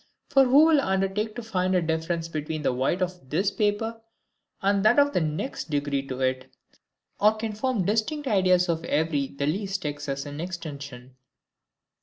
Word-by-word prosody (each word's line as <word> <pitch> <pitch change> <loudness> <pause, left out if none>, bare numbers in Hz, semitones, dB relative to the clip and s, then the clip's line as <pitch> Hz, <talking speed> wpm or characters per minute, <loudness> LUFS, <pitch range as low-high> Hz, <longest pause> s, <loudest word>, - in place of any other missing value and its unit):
For 270 -1 +5
who 275 +5 +6
will 315 -3 +5
undertake 195 +1 -1
to 240 - -5
find 185 -4 0
a 180 - +3
difference 165 +1 -1
between 155 -1 -4
the 130 - +1
white 135 +9 0
of 180 -7 -6
this 190 +7 +1
paper 225 +2 -1 0.6
and 195 0 +1
that 215 +5 +5
of 285 0 +4
the - - +2
next 155 - -3
degree 145 -2 0
to 130 -1 -5
it: 130 0 -1 0.7
or 215 +2 +4
can 220 0 -4
form 220 -3 -1
distinct 250 - -1
ideas 185 -4 +3
of 165 -1 -1
every 150 -3 0
the 140 +1 -4
least 190 +3 -2
excess 145 -1 -3
in 145 +1 -6
extension? 140 -8 -7
180 Hz, 170 wpm, -26 LUFS, 145-215 Hz, 0.7 s, who